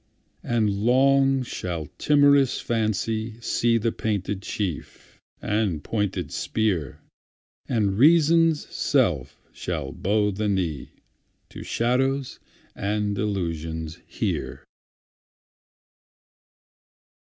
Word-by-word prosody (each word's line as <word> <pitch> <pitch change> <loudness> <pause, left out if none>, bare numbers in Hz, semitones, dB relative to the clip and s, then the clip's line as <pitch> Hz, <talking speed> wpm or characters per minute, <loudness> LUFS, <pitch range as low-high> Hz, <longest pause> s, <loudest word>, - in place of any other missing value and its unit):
And 115 -3 +1
long 135 +5 +3
shall 85 -9 -4
timorous 140 -3 +4
Fancy 110 0 -1
seeThe 115 0 0
painted 100 -2 -2
chief, 95 -6 -5 0.2
and 105 -7 -1
pointed 100 -7 -2
spear, 95 -11 -1 0.7
And 105 -5 +1
Reason's 165 +1 +4
self - - 0
shall - - -4
bow 105 +1 +1
the 105 +2 -3
kneeTo 90 -9 -5
shadows 130 +3 0 0.4
and 105 +1 -1
delusions 80 -6 -3
here. - - -3
110 Hz, 75 wpm, -24 LUFS, 95-125 Hz, 0.7 s, timorous